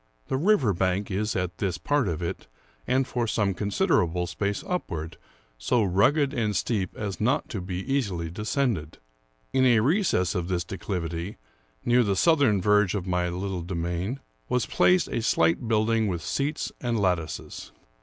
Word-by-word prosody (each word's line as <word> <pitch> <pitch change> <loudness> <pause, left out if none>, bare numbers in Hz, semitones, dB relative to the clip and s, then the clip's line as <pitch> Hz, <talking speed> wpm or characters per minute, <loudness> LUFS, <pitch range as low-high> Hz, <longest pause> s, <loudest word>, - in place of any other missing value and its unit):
The 130 - +1
river 150 - +3
bank 95 +3 0
is, 105 +3 -1
at 90 -1 -2
this 95 -4 -1
part 145 -6 +1
of 85 -1 -2
it 85 - -4 0.4
and 130 +1 +2
for 120 -2 -1
some 105 -3 +1
considerable 95 - +1
space 100 +4 -2
upward, 85 - -3 0.4
so 110 - +2
rugged 135 - +3
and 110 -6 0
steep 95 0 -1
as 100 -2 -4
not 125 +6 +1
to 100 - -4
be 90 0 -4
easily 100 -11 -1
descended. 105 - -1 0.6
In 130 - +3
a 120 -3 +5
recess 145 - +2
of 90 -3 -2
this 90 -2 -1
declivity, 90 0 -4 0.5
near 120 +1 +4
the 100 -4 +1
southern 140 - +3
verge 105 -1 +3
of 95 -3 -3
my 90 -1 0
little 90 +1 -3
demesne, 90 +7 -3 0.3
was 125 -2 +1
placed 180 0 +3
a - - -1
slight 85 +1 +2
building, 110 0 +2
with 85 -4 -3
seats 145 +2 -2
and 120 -3 0
lattices. 90 -5 -2
100 Hz, 160 wpm, -26 LUFS, 90-120 Hz, 0.6 s, a